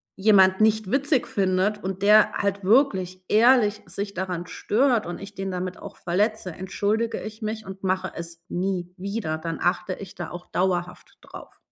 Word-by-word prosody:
jemand 190 -2 +5
nicht 215 -2 +2
witzig 275 -1 +2
findet 195 +2 0
und 190 0 -4
der 210 +1 +6
halt 200 0 -1
wirklich 190 -5 +2
ehrlich 220 -2 +4
sich 200 +3 -5
daran 180 -2 -3
stört 240 +4 +1
und 175 - -6
ich 200 +1 -9
den 195 0 -4
damit 180 0 -4
auch - - -10
verletze, 200 +2 -1
entschuldige 205 +6 -1
ich 215 +1 -8
mich 220 0 -4
und 190 0 -9
mache 185 -1 -1
es 170 0 -8
nie 180 -1 -2
wieder. 195 -4 -3
Dann 165 +1 -5
achte 180 +1 0
ich 195 -1 -9
da - - -6
auch 175 +1 -9
dauerhaft 180 -1 -2
drauf. - - -12
195 Hz, 170 wpm, -24 LUFS, 180-215 Hz, -, der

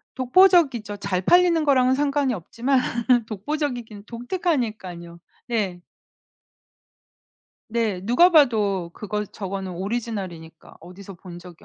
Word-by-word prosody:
독보적이죠. 260 - +3
잘 190 -2 -2
팔리는 345 - +4
거랑은 260 -3 +3
상관이 280 -2 0
없지만 240 +8 -1 0.5
독보적이긴 235 -2 -4
독특하니깐요. 225 - -4 0.3
네. 195 -7 -2 1.9
네. 220 -5 -1
누가 245 - +5
봐도 210 - +2
그거 210 +1 -4
저거는 195 -2 -6
오리지널이니까 190 -5 -6
어디서 185 +3 -12
본 175 0 -11
적이 175 -1 -14
220 Hz, 275 characters per minute, -23 LUFS, 190-265 Hz, 1.9 s, 누가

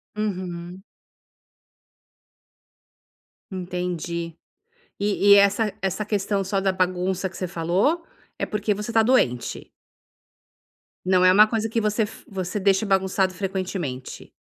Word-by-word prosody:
Uhum. 185 -3 -4 2.7
Entendi, 175 -2 -4 0.6
e 205 0 +3
e - - +9
essa 200 +1 +3
essa 195 +2 -1
questão 200 -1 0
só 195 +1 -1
da 190 -1 +2
bagunça 185 0 -1
que - - -15
você 185 - -3
falou, 190 - 0 0.3
é - - -1
porque 210 0 -1
você 210 +3 -5
está 225 0 +4
doente? 130 - +1 1.4
Não 185 -1 +3
é 185 - +7
uma 210 +2 +7
coisa 225 0 -1
que 225 +1 -1
você 210 +1 +1
f 210 - -8
você 190 0 -3
deixe 195 +2 +2
bagunçado 190 -1 +1
frequentemente. 185 -9 -4
190 Hz, 120 wpm, -24 LUFS, 180-210 Hz, 2.7 s, e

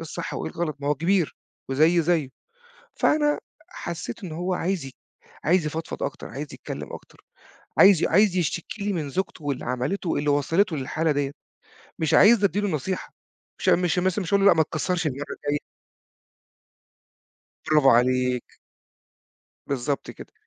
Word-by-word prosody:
الصح - - -5
وإيه - - -4
الغلط 165 -4 -3
ما 140 - -2
هو 150 - +3
كبير 170 +3 +1 0.3
وزيي 160 +5 +4
زيه، 160 -5 +1 0.7
فأنا 295 -1 +2 0.3
حسّيت 160 - -6
إنّه 160 -3 -6
هو 180 +2 -1
عايز 180 -3 -1
ي 135 - -8 0.5
عايز 165 +1 +3
يفضفض 160 +2 -5
أكتر - - -4
عايز - - -6
يتكلّم - - -7
أكتر، - - -12 0.6
عايز 190 -4 +7
عايز 195 +2 +4
يشتكي 175 +4 -2
لي 205 -1 0
من 155 -5 -3
زوجته 185 -1 -3
واللي 140 -3 -2
عملته 130 +9 -2
واللي 145 -1 0
وصلته 160 +6 +2
للحالة 155 +4 -1
ديّة، 140 -1 -1 0.7
مش 160 - 0
عايزني 210 0 +6
أدّي 195 +2 +1
له 205 - 0
نصيحة 180 +3 -3 0.5
مش - - +1
مش 180 0 +3 0.2
مش 185 0 -3
هاقول 200 0 +4
له: - - +8
"لأ - - +7
ما 160 - +5
تكسرش 175 +3 -1
المرّة 140 0 -4
الجايّة." 145 0 -2 2.1
برافو 150 -3 +5
عليك. 125 +1 +2 1.2
بالضبط 140 +1 -2
كده. - - -12
160 Hz, 150 wpm, -25 LUFS, 145-185 Hz, 2.1 s, له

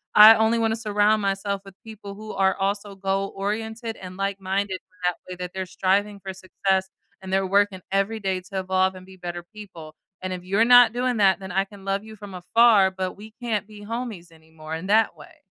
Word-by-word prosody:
I 215 +1 +11
only 220 +1 +2
wanna 225 -1 +1
surround 215 -1 +2
myself 195 0 -1
with 195 -1 -13
people 215 -3 -9
who 215 +1 -8
are 190 -1 +2
also 200 +1 -2
goal-oriented 205 +4 -3
and 185 0 -9
like-minded 195 -1 -2 0.3
that 180 -1 +2
way 180 - -5
that 180 0 -5
they're 190 0 -3
striving 200 +3 0
for 190 -1 -7
success, 190 0 -1 0.3
and 190 -1 -8
they're 190 0 +1
working 200 -1 +2
every 195 +3 0
day 190 -2 -2
to 190 +1 -5
evolve 190 0 +1
and 185 0 -11
be 190 0 -14
better 175 -1 -6
people, 175 -7 -11 0.3
and 185 0 -3
if 180 -1 -7
you're 195 +5 +2
not 245 -1 +7
doing 250 0 0
that, 195 -2 +4
then 190 -1 -8
I 195 +2 +2
can 200 -1 -15
love 195 +1 -1
you 220 0 -11
from 205 -2 -10
afar, 200 +2 +4
but 185 -1 -4
we 215 +2 -12
can't 215 -4 -2
be 210 -1 -13
homies 220 -7 -5
anymore 160 -1 -11
in 165 +4 -6
that 215 -2 +3
way. 150 -2 -15
195 Hz, 205 wpm, -24 LUFS, 185-215 Hz, 0.3 s, I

